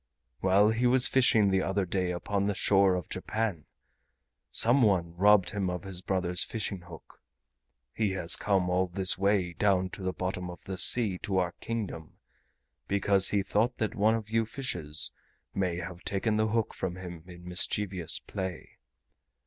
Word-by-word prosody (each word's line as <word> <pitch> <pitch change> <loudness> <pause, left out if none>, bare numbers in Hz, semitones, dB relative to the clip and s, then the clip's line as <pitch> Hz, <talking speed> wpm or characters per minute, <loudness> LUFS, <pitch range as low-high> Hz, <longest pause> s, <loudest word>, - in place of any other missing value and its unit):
While 100 +3 +4
he 115 +3 +1
was 125 0 +4
fishing 110 -6 +3
the 95 0 +2
other 95 0 -1
day 90 0 -1
upon 100 +3 -2
the 100 - -1
shore 95 -1 +4
of 90 -3 -4
Japan, 105 -8 -3 0.9
some 120 +4 +3
one 90 -6 +1
robbed 100 +1 +4
him 100 -2 -2
of 90 -1 -4
his 95 -2 -6
brother's 90 -2 0
fishing 100 -4 -4
hook. 85 -2 -14 0.7
He 105 -4 -1
has 90 -2 +4
come 95 -3 0
all 90 +1 +1
this 95 +1 +2
way 100 -3 +1
down 95 0 +1
to - - -8
the 95 0 -1
bottom 90 -1 -4
of 90 - -10
the 95 -1 -5
sea 100 -1 +2
to 100 -3 -2
our 90 -2 +1
Kingdom 105 -9 -5 0.7
because 100 -1 +3
he 100 -2 +1
thought 115 +6 0
that 110 0 -2
one 110 0 +2
of 110 -1 -6
you 115 0 +2
fishes 90 - 0 0.4
may 90 -3 -1
have 90 0 -7
taken 105 +2 -1
the 110 0 +1
hook 110 0 -1
from 90 -1 -4
him 90 -3 -9
in 90 -1 -12
mischievous 90 -1 -1
play. 95 -4 -7
95 Hz, 170 wpm, -29 LUFS, 90-105 Hz, 0.9 s, While